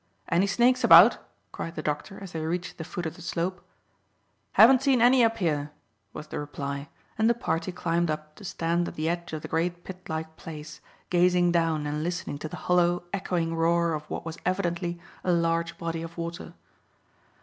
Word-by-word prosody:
"Any 175 +4 +3
snakes 245 +5 +3
about?" 195 0 +8 0.3
cried 165 - -6
the 155 - -5
doctor, 150 +6 -3
as 190 - -8
they 165 - -4
reached 175 +3 -3
the - - -3
foot 175 +2 -5
of 160 - -4
the - - -13
slope. 175 +1 -3 0.9
"Haven't 250 +3 +7
seen 270 -2 +3
any 245 +1 +6
up 225 0 +2
here," 150 -7 -1 0.4
was 150 - -8
the - - -5
reply; 140 -1 -5 0.3
and 220 +1 +4
the 235 - +3
party 165 -5 -2
climbed 170 -1 0
up 155 0 -4
to - - -12
stand 170 -1 -1
at - - -7
the 155 +1 -2
edge 170 +1 -2
of 155 -1 -5
the - - -5
great 175 +2 -1
pit 185 -1 -10
like 160 0 -4
place, 155 -1 -9 0.3
gazing 180 0 +4
down 165 -3 +1
and 150 +1 -2
listening 175 -4 -3
to 155 - -5
the - - -7
hollow, 175 0 +3
echoing 175 -4 -1
roar 170 0 +2
of 150 0 -5
what - - -5
was 165 0 -6
evidently 175 -2 -1 0.2
a 180 - +1
large 170 -1 0
body 165 -1 -3
of 165 +1 -8
water. 170 +1 -6
170 Hz, 195 wpm, -27 LUFS, 160-180 Hz, 0.9 s, about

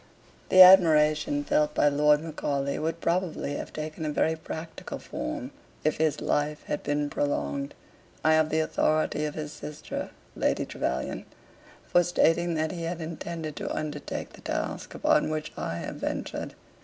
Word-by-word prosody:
The 185 0 +10
admiration 155 -5 +6
felt 150 +1 +1
by - - +4
Lord 150 +1 +4
Macaulay 140 -3 -2
would 165 +1 -2
probably 170 -4 -1
have - - -6
taken 155 +1 -5
a 155 - -1
very 160 +2 +1
practical 160 +1 -7
form, - - -5 0.3
if 155 - +1
his 155 -1 +1
life 150 +1 0
had 150 - -3
been 145 0 0
prolonged. 145 -1 -2 0.5
I 160 - +6
have 155 0 +3
the 160 +1 +2
authority 155 -1 +1
of 150 - -4
his 150 -1 -5
sister, 150 0 -6 0.3
Lady - - +1
Trevelyan, 65 +1 -3 0.6
for 175 - +4
stating 170 0 +2
that 155 0 0
he 175 - -5
had 165 +1 -3
intended 160 -1 -5
to - - -4
undertake 155 -1 -4
the - - -14
task - - -4
upon - - +3
which 155 0 -3
I - - -3
have - - -5
ventured. - - -4
155 Hz, 155 wpm, -27 LUFS, 150-160 Hz, 0.6 s, The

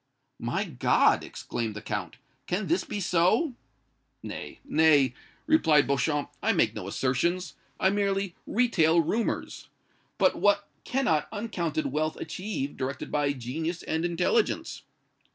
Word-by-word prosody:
"My - - -1
God!" - - +3
exclaimed 110 -3 -4
the 110 - -6
Count. - - -4 0.3
"Can 195 +4 -1
this 345 - +1
be 205 - -4
so?" 185 - +2 0.7
"Nay - - -7
nay," 155 - +4 0.3
replied 155 - +4
Beauchamp, 145 +1 0
"I - - +2
make - - +2
no - - -6
assertions, 155 +6 0 0.3
I 190 - +3
merely 195 -2 0
retail 175 -9 +3
rumors. 220 +8 -2 0.5
But - - +3
what 205 0 +2 0.2
cannot 245 - +1
uncounted 175 - -2
wealth 155 +2 0
achieve, 185 -8 -4
directed 130 0 -4
by 145 -1 +1
genius 155 +7 -4
and 160 +1 -1
intelligence?" 175 - 0
170 Hz, 125 wpm, -28 LUFS, 145-205 Hz, 0.7 s, nay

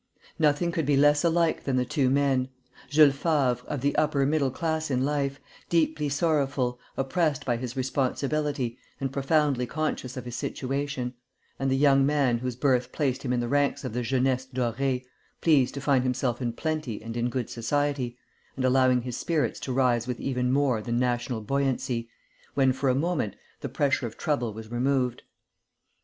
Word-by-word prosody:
Nothing 155 +2 +2
could 165 -5 -1
be 145 -2 +3
less 145 +1 +4
alike 170 -1 +2
than 135 - -1
the 125 0 +2
two 135 -1 +1
men: 135 -1 +2 0.4
Jules 145 0 +6
Favre, 140 -4 +1
of 145 -4 -3
the 140 +1 +1
upper 145 -3 +2
middle 145 -1 +2
class 160 +2 -2
in 130 -1 +1
life, 140 -1 -1 0.3
deeply 155 -3 +1
sorrowful, 140 -5 0 0.2
oppressed 150 +1 0
by 120 - +1
his 125 +1 -6
responsibility, 135 0 -1 0.2
and 135 -1 -3
profoundly 140 -2 +1
conscious 150 -4 -3
of 125 - -6
his 120 -1 -6
situation; 135 -2 -3 0.5
and 135 - 0
the 135 - +2
young 135 -1 +5
man 135 -4 +2
whose 125 0 -3
birth 125 -1 +1
placed 135 -4 -1
him 130 - -2
in 125 -1 +1
the 120 - -2
ranks 145 +2 +1
of 130 -4 -4
the 125 - -1
jeunesse 130 +1 0
dorée, 130 +1 -1 0.4
pleased 145 -6 +3
to 140 - -4
find 135 -2 +3
himself 125 -1 -1
in 120 -2 0
plenty 155 -5 -3
and 115 0 -6
in 120 +1 0
good 125 -2 -3
society, 130 0 -1 0.4
and 130 - -1
allowing 130 -1 +4
his 125 -1 -4
spirits 160 0 -1
to 130 - -4
rise 125 -2 +2
with 125 -1 -3
even 125 -2 -1
more 135 -5 +2
than 120 +3 -2
national 120 -1 0
buoyancy, 125 -1 -1 0.5
when, 135 -2 +4
for 135 +1 0
a 125 - +3
moment, 150 - -1 0.2
the - - -5
pressure 140 -3 +1
of 110 - -11
trouble 130 -7 -1
was 110 +1 -9
removed. 125 0 0
135 Hz, 175 wpm, -27 LUFS, 125-145 Hz, 0.5 s, Jules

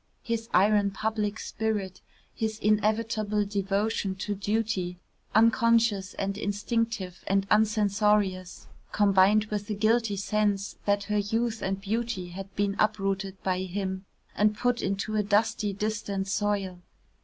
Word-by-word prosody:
His 230 -1 -3
iron 205 +2 +4
public 215 +1 -2
spirit, 210 -5 -3 0.3
his 220 -1 -2
inevitable 215 0 +1
devotion 200 0 -1
to 205 +2 -3
duty, 200 -3 -1 0.4
unconscious 225 -3 +3
and 195 +1 -3
instinctive 205 -2 -2
and 195 0 +2
uncensorious, 210 -3 +2 0.3
combined 205 +1 +4
with 205 0 -3
a 210 - -1
guilty 220 0 +2
sense 205 0 0
that 200 0 +2
her 210 0 0
youth 225 +2 -1
and 190 0 -2
beauty 215 -2 -2
had 195 +2 -8
been 200 -1 0
uprooted 195 -2 -1
by 185 -1 0
him, 190 +1 -3 0.3
and 210 0 +2
put 245 0 +1
into 195 +2 -2
a - - +3
dusty 210 +1 +1
distant 200 -1 -3
soil. 200 -3 -1
205 Hz, 125 wpm, -27 LUFS, 195-215 Hz, 0.4 s, iron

